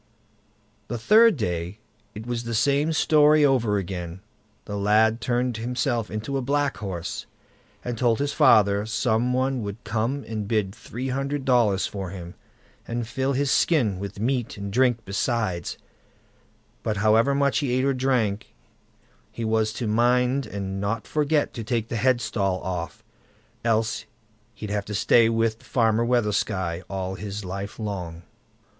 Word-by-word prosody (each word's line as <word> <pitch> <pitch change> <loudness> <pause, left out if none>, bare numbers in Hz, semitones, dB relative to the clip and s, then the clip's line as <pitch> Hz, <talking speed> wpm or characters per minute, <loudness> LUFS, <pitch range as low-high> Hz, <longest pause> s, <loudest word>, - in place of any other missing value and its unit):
The 120 - -3
third 215 - +5
day, 90 -3 -3 0.4
it 110 +2 -7
was 120 -1 -3
the 115 -1 -3
same 145 +6 +2
story 150 -1 +5
over 120 -7 +2
again: 90 -2 -5 0.4
the 105 - -5
lad 110 +3 +3
turned 120 -1 0
himself 120 0 -1
into 110 +6 -3
a - - -1
black 145 +2 0
horse, 95 -5 -5 0.6
and 120 -2 -3
told 120 -3 +3
his 145 0 -1
father 105 -8 +4
some 115 +2 +1
one 130 0 0
would 100 +2 -6
come 115 +6 -2
and 110 -2 -4
bid 105 -3 0
three 120 +4 -6
hundred 135 +1 -2
dollars 115 -7 +3
for 95 -3 -5
him, 90 -2 -8 0.5
and 120 -1 -3
fill 135 +3 -1
his 140 +1 +1
skin 115 - +2
with 100 0 -6
meat 120 0 -1
and 100 0 -6
drink 125 -1 +2
besides; 100 -3 -2 1.0
but 110 -1 -2
however 110 +6 +3
much 140 -1 +2
he 140 -4 -1
ate 130 +1 +1
or 140 - +2
drank, 125 -6 -1 0.8
he 115 - -4
was 110 0 +1
to 120 - -4
mind 125 +4 +2
and 100 -2 -4
not 105 +2 -2
forget 150 0 0
to 115 - -5
take 115 -1 -2
the - - -3
headstall 110 -6 +1
off, 85 -2 -5 0.6
else 110 -1 0 0.5
he'd 105 -1 -6
have 105 -1 -1
to 105 - -5
stay 115 +3 +4
with 115 -1 0
Farmer 115 -2 +1
Weathersky 105 -7 0
all 95 -1 -3
his 100 +1 -6
life 100 +2 -5
long. 90 -6 -5
115 Hz, 150 wpm, -25 LUFS, 100-125 Hz, 1.0 s, third